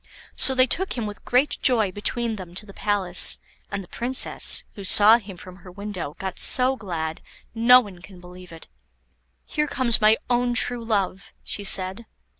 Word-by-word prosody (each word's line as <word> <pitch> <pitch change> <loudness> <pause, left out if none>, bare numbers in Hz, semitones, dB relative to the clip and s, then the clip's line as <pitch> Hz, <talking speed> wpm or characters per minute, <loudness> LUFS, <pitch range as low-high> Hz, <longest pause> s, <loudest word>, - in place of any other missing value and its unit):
So 265 - +1
they 255 0 +4
took 375 +9 -1
him 235 -3 -5
with 205 -1 -9
great 255 +4 0
joy 225 -7 +1
between 230 +3 -3
them 180 -2 -11
to 210 - -5
the 200 - -14
palace, 195 -4 +3 0.3
and 200 -1 -6
the - - -17
Princess, 250 +6 0
who 200 - -11
saw 210 +4 +5
him 195 -4 -12
from 185 +1 -13
her 180 -1 -15
window, 195 -6 -8
got 190 0 -7
so 255 +1 +4
glad, 165 -8 -6 0.3
no 235 +2 +5
one 195 -6 -13
can 185 0 -15
believe 180 0 -14
it. 165 -1 -14 0.8
"Here 300 0 -3
comes 250 -5 +2
my 215 +1 +4
own 245 0 -1
true 245 -1 +2
love," 200 -4 -3
she 205 - -6
said. 190 +3 +2
205 Hz, 180 wpm, -22 LUFS, 185-240 Hz, 0.8 s, saw